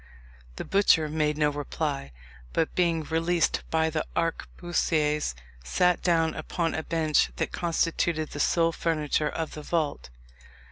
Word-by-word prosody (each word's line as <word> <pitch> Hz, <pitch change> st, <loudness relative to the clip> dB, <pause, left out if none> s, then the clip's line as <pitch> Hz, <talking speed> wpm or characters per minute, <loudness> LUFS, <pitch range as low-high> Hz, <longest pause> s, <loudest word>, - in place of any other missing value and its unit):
The -, -, -5 dB
butcher 195 Hz, -6 st, +4 dB
made 150 Hz, -1 st, 0 dB
no 150 Hz, -1 st, +2 dB
reply, 100 Hz, -, -3 dB, 0.4 s
but 165 Hz, -, 0 dB
being 170 Hz, -3 st, +1 dB
released 165 Hz, +2 st, +1 dB
by 160 Hz, 0 st, +1 dB
the 155 Hz, -1 st, -1 dB
arquebusiers, 160 Hz, -, 0 dB, 0.3 s
sat 180 Hz, -, +2 dB
down 165 Hz, -2 st, +2 dB
upon 165 Hz, +1 st, -2 dB
a 160 Hz, -, -2 dB
bench 155 Hz, -, +1 dB
that -, -, -2 dB
constituted 165 Hz, -2 st, 0 dB
the 145 Hz, -, -6 dB
sole 165 Hz, +2 st, +3 dB
furniture 155 Hz, -2 st, 0 dB
of 160 Hz, +1 st, -4 dB
the 155 Hz, -, -7 dB
vault. 150 Hz, -, -2 dB
160 Hz, 135 wpm, -27 LUFS, 150-165 Hz, 0.4 s, butcher